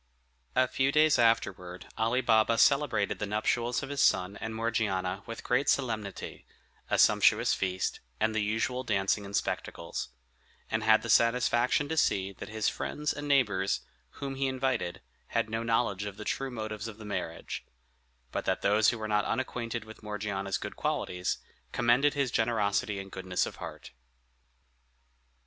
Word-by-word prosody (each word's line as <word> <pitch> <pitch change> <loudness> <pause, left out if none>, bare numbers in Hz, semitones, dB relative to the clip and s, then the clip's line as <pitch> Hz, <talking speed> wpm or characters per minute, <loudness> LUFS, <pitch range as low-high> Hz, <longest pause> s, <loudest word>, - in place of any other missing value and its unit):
A 130 - +4
few 135 +2 +1
days 155 -1 +4
afterward 90 -6 +1
Ali 115 +3 +1
Baba 115 -1 +3
celebrated 130 -7 +3
the 105 - -2
nuptials 115 +4 0
of 140 - -5
his 145 -1 -1
son 90 +2 +3
and 110 0 -5
Morgiana 100 -5 -1
with 115 - -7
great 125 +3 +1
solemnity, 110 -7 -2 0.4
a - - +2
sumptuous - - +5
feast, 95 -1 -1 0.2
and 110 0 +2
the 110 - +1
usual 110 +5 -1
dancing 100 -2 0
and 100 +1 -5
spectacles; - - -3 0.6
and 110 0 0
had 110 0 +5
the 115 - -5
satisfaction 120 +4 +3
to 160 +2 -3
see 95 -8 +2
that - - -9
his 110 -1 -1
friends 150 0 -2
and 145 0 -6
neighbors, 100 - +2 0.3
whom 140 -1 -5
he 135 0 0
invited, 130 -8 -1 0.3
had 110 - -1
no 110 +1 -1
knowledge 115 -4 0
of 100 -1 -6
the 105 - -7
true 135 0 -2
motives 110 -2 -5
of 110 -2 -8
the 110 - -10
marriage; 105 - -4 0.7
but - - -3
that - - 0
those 105 +1 +4
who 120 - -1
were 110 -1 -4
not 105 -1 +1
unacquainted 120 -3 -2
with 110 0 -12
Morgiana's 105 -2 -3
good - - -6
qualities, 90 0 -1 0.3
commended 130 +5 +3
his 140 -4 0
generosity 105 -3 +1
and 95 0 -8
goodness 95 -1 -1
of - - -8
heart. - - -8
110 Hz, 160 wpm, -30 LUFS, 100-125 Hz, 0.7 s, sumptuous